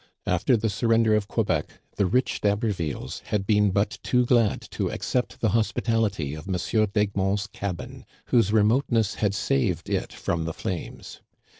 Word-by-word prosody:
After 90 Hz, +8 st, +2 dB
the 110 Hz, +1 st, -1 dB
surrender 115 Hz, +1 st, +2 dB
of 105 Hz, -2 st, 0 dB
Quebec, 90 Hz, -10 st, -1 dB, 0.2 s
the 100 Hz, -, +2 dB
rich 125 Hz, +6 st, 0 dB
D'Habervilles 100 Hz, -, -1 dB
had 105 Hz, -2 st, -1 dB
been 105 Hz, 0 st, +3 dB
but 100 Hz, +1 st, 0 dB
too 125 Hz, -1 st, +2 dB
glad 120 Hz, -4 st, +3 dB
to -, -, -1 dB
accept 125 Hz, -1 st, -2 dB
the 110 Hz, -, +3 dB
hos 110 Hz, +1 st, +1 dB
pitality 100 Hz, -, -1 dB
of 80 Hz, +5 st, -9 dB
M. 100 Hz, +4 st, +1 dB
d'Egmont's 100 Hz, -1 st, 0 dB
cabin, 100 Hz, -4 st, -6 dB, 0.2 s
whose 115 Hz, -5 st, +3 dB
remoteness 110 Hz, 0 st, +2 dB
had 100 Hz, -2 st, +1 dB
saved 120 Hz, -6 st, 0 dB
it -, -, -1 dB
from 85 Hz, -1 st, -2 dB
the 80 Hz, -, -3 dB
flames. 90 Hz, +1 st, -6 dB
105 Hz, 155 wpm, -25 LUFS, 95-115 Hz, 0.2 s, been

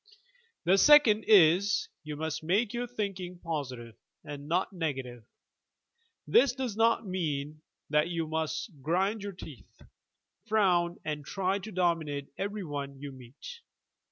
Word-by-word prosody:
The 190 Hz, +3 st, +4 dB
second 270 Hz, -7 st, +6 dB
is: 195 Hz, 0 st, +5 dB, 0.2 s
You 150 Hz, -1 st, -6 dB
must 160 Hz, +1 st, -3 dB
make 200 Hz, +7 st, +1 dB
your 245 Hz, +1 st, -2 dB
thinking 195 Hz, -6 st, -4 dB
positive 135 Hz, -9 st, -5 dB, 0.3 s
and 145 Hz, -1 st, -8 dB
not 180 Hz, +5 st, 0 dB
negative. 135 Hz, -, -4 dB, 1.0 s
This 255 Hz, 0 st, +4 dB
does 255 Hz, -5 st, -4 dB
not 225 Hz, 0 st, +2 dB
mean 155 Hz, -5 st, -3 dB, 0.3 s
that 150 Hz, +2 st, +3 dB
you 165 Hz, -2 st, -2 dB
must 160 Hz, +3 st, -3 dB
grind 190 Hz, +8 st, 0 dB
your 200 Hz, 0 st, -5 dB
teeth, 155 Hz, -, -12 dB, 0.7 s
frown 180 Hz, -5 st, +2 dB
and 150 Hz, -1 st, -3 dB
try 190 Hz, +5 st, -1 dB
to 215 Hz, +3 st, -8 dB
dominate 165 Hz, -6 st, -1 dB
every 205 Hz, +1 st, -4 dB
one 140 Hz, -3 st, -5 dB
you 145 Hz, 0 st, -7 dB
meet. 130 Hz, -, -11 dB
175 Hz, 130 wpm, -29 LUFS, 150-200 Hz, 1.0 s, second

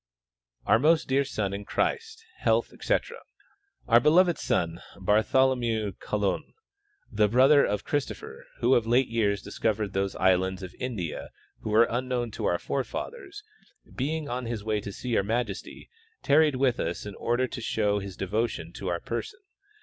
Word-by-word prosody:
Our -, -, +4 dB
most 155 Hz, +4 st, +3 dB
dear 135 Hz, +1 st, +2 dB
son 105 Hz, -7 st, -3 dB
in 100 Hz, +1 st, -4 dB
Christ, 450 Hz, -, -2 dB
health, -, -, +1 dB
etc: -, -, -1 dB, 0.7 s
Our 120 Hz, -1 st, +7 dB
beloved 170 Hz, +6 st, +4 dB
son, 85 Hz, 0 st, -1 dB, 0.2 s
Bartholomew 110 Hz, +1 st, +2 dB
Colum, 105 Hz, -3 st, -2 dB, 0.6 s
the 105 Hz, -2 st, +3 dB
brother 130 Hz, +6 st, +5 dB
of 105 Hz, 0 st, -1 dB
Christopher, 445 Hz, -, -4 dB
who -, -, +4 dB
of 115 Hz, -2 st, +2 dB
late 125 Hz, +3 st, +3 dB
years 105 Hz, -4 st, 0 dB
discovered 105 Hz, -3 st, -2 dB
those 95 Hz, 0 st, -1 dB
islands 95 Hz, 0 st, +2 dB
of 95 Hz, -, -8 dB
India 110 Hz, -11 st, -4 dB, 0.3 s
which -, -, -6 dB
were 115 Hz, +2 st, +5 dB
unknown 120 Hz, -1 st, -2 dB
to -, -, -4 dB
our 85 Hz, -, +2 dB
forefathers, 390 Hz, -, -5 dB, 0.5 s
being 150 Hz, +3 st, -2 dB
on 125 Hz, -1 st, -3 dB
his 115 Hz, -3 st, -4 dB
way 105 Hz, -1 st, -1 dB
to 100 Hz, -, -6 dB
see 125 Hz, -, -7 dB
your 115 Hz, -, +3 dB
majesty, 110 Hz, -1 st, -3 dB, 0.4 s
tarried 150 Hz, 0 st, +4 dB
with 130 Hz, -2 st, +1 dB
us 85 Hz, +4 st, -3 dB
in 105 Hz, -, -6 dB
order 120 Hz, +5 st, 0 dB
to 125 Hz, -, -6 dB
show 105 Hz, -2 st, 0 dB
his 100 Hz, -2 st, -8 dB
devotion 95 Hz, -4 st, -2 dB
to 95 Hz, -, -6 dB
our 85 Hz, -1 st, -1 dB
person. 120 Hz, -, -5 dB
115 Hz, 155 wpm, -27 LUFS, 100-135 Hz, 0.7 s, Our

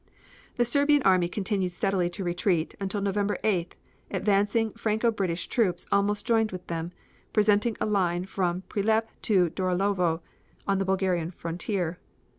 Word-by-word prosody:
The 240 Hz, -, +2 dB
Serbian 285 Hz, +3 st, +3 dB
army 185 Hz, -2 st, +4 dB
continued 190 Hz, -2 st, -1 dB
steadily 180 Hz, -1 st, 0 dB
to 175 Hz, +2 st, -5 dB
retreat, 175 Hz, -1 st, 0 dB
until 195 Hz, +1 st, -2 dB
on 200 Hz, -, -2 dB
November 200 Hz, 0 st, 0 dB
8th, 180 Hz, -5 st, 0 dB, 0.4 s
advancing 205 Hz, +3 st, +1 dB
Franco 225 Hz, 0 st, +1 dB
British 185 Hz, -5 st, -2 dB
troops 180 Hz, -7 st, 0 dB
almost 205 Hz, +1 st, +1 dB
joined 225 Hz, -2 st, +2 dB
with 180 Hz, -1 st, -7 dB
them, 165 Hz, 0 st, -4 dB, 0.4 s
presenting 210 Hz, +1 st, +3 dB
a -, -, 0 dB
line 180 Hz, -4 st, +1 dB
from 185 Hz, -1 st, -1 dB
Prilep 220 Hz, +3 st, 0 dB
to 185 Hz, -6 st, +3 dB
Dorolovo 185 Hz, -2 st, 0 dB, 0.5 s
on 195 Hz, -1 st, +2 dB
the 195 Hz, -, 0 dB
Bulgarian 185 Hz, -3 st, 0 dB
frontier. 175 Hz, +1 st, -3 dB
195 Hz, 145 wpm, -27 LUFS, 180-210 Hz, 0.5 s, army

